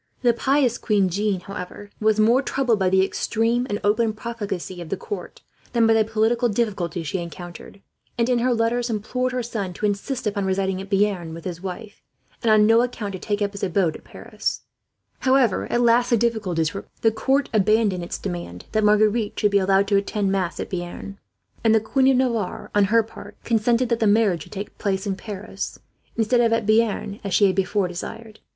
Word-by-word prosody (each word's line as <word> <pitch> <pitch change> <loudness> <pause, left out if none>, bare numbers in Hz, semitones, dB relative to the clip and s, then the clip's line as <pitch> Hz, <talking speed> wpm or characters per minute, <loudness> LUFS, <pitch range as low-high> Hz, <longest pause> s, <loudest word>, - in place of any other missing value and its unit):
The 240 -1 +5
pious 260 0 +1
queen, 200 -4 +2 0.3
however, 195 +1 -8
was 215 0 +2
more 230 +5 +5
troubled 255 -5 0
by 190 -1 +2
the 190 0 +4
extreme 230 +5 0
and 205 0 -1
open 220 +2 +2
profligacy 205 -6 -5
of 165 - -8
the 195 - -2
court 410 - -7 0.3
than 235 -2 +4
by 225 - +5
the 225 -1 +4
political 225 +3 +1
difficulties 195 -7 -2
she 185 +5 -2
encountered 175 +3 -9 0.3
and, 235 0 +2
in 250 -1 +2
her 250 +2 +2
letters, 235 +1 0
implored 250 +4 -1
her 250 -1 -2
son 210 -6 -4
to 210 - -3
insist 210 +6 -2
upon 200 -2 -1
residing 190 0 0
at 195 - -10
Bearn 195 -5 0
with 165 - -10
his 175 -2 -5
wife, 195 +3 -7 0.4
and 230 - +1
on 215 -1 +6
no 225 +2 +5
account 230 -5 -3
to 185 - -5
take 205 +1 -1
up 200 - -1
his 200 - -9
abode 180 -3 +1
at - - -11
Paris. - - -5 0.6
However, 260 -6 +2
at 240 - +2
last 240 +1 +4
the 235 - +4
difficulties 200 -9 0
were 195 - -4
removed. - - -31
The 225 - +5
court 270 +5 +1
abandoned 210 -3 +2
its 170 - -4
demand 85 0 -6
that 215 0 +1
Marguerite 210 +1 +2
should 210 - +2
be 200 - +4
allowed 195 +1 +3
to 200 - +4
attend 200 0 0
mass 185 -3 -1
at - - -5
Bearn; 180 +2 -6 0.4
and 225 -1 +4
the - - +5
Queen 260 +5 +1
of 265 -1 +4
Navarre, 235 -7 -1
on 205 -1 +4
her 225 +3 +3
part, 225 - -12
consented 235 +2 +1
that 235 -1 +1
the 220 - +2
marriage 205 -5 +3
should - - -11
take 200 0 -7
place 195 -1 -1
at 195 -2 -1
Paris, 200 -2 -6 0.4
instead 230 +2 +3
of 230 -1 +3
at 230 -1 0
Bearn 215 -2 +1
as 200 -2 -1
she 205 - +5
had 190 -2 +2
before 195 0 +1
desired. 215 +5 -8
210 Hz, 205 wpm, -23 LUFS, 195-230 Hz, 0.6 s, on